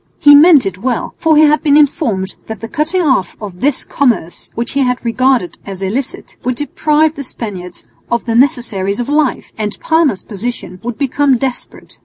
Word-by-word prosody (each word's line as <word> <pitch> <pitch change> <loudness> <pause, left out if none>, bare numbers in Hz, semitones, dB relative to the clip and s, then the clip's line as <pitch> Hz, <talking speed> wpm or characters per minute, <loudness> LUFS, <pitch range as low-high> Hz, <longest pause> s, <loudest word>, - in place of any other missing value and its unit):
He 290 - +6
meant 295 -1 +7
it 190 -1 -4
well, 245 +3 -2
for 320 -2 +3
he 310 - +6
had 300 0 +4
been 295 -2 +4
informed 235 -10 +1
that 220 -2 -6
the 225 - -6
cutting 330 +6 0
off 260 - +1
of 195 -4 -9
this 280 0 +1
commerce, 235 -11 -1
which 235 0 -3
he 280 0 +1 0.2
regarded 245 -4 0
as 195 -1 -7
illicit, 240 +8 -4
would 255 0 -1
deprive 300 +2 +1
the 280 - -6
Spaniards 190 -8 -7 0.2
of 235 -1 -1
the 230 - -1
necessaries 230 -5 +1
of 245 +2 -3
life, 295 -2 0
and 210 -1 -3
Parma's 320 - +1
position 205 -3 -5
would 240 -1 -5
become 280 -1 +1
desperate. 255 0 -6
250 Hz, 180 wpm, -15 LUFS, 210-290 Hz, 0.2 s, meant